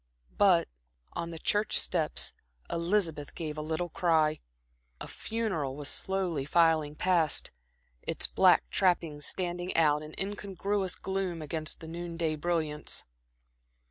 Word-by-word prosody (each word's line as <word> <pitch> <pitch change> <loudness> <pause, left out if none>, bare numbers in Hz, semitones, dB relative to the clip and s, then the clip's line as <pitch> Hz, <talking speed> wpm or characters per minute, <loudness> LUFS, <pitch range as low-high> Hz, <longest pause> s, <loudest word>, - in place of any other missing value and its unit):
But - - +5 0.5
on 170 - -3
the 165 - -7
church 205 +6 +2
steps 160 -4 +2 0.4
Elizabeth 170 -4 0
gave 155 -3 -4
a 155 - -4
little 160 +3 -2
cry. 160 -2 +2 0.6
A - - -6
funeral 190 -12 -2
was 145 0 -3
slowly 185 -7 -1
filing 155 -1 +3
past, 170 -3 +2 0.5
its - - -1
black - - +4
trappings 165 -5 +1
standing 175 0 -2
out 150 -2 +4
in 155 0 -9
incongruous 195 -1 -2
gloom 190 -3 -2
against 155 +1 -2
the 160 - -8
noon 170 0 -6
day 165 -2 +1
brilliance. 155 -2 -1
165 Hz, 125 wpm, -30 LUFS, 155-185 Hz, 0.6 s, But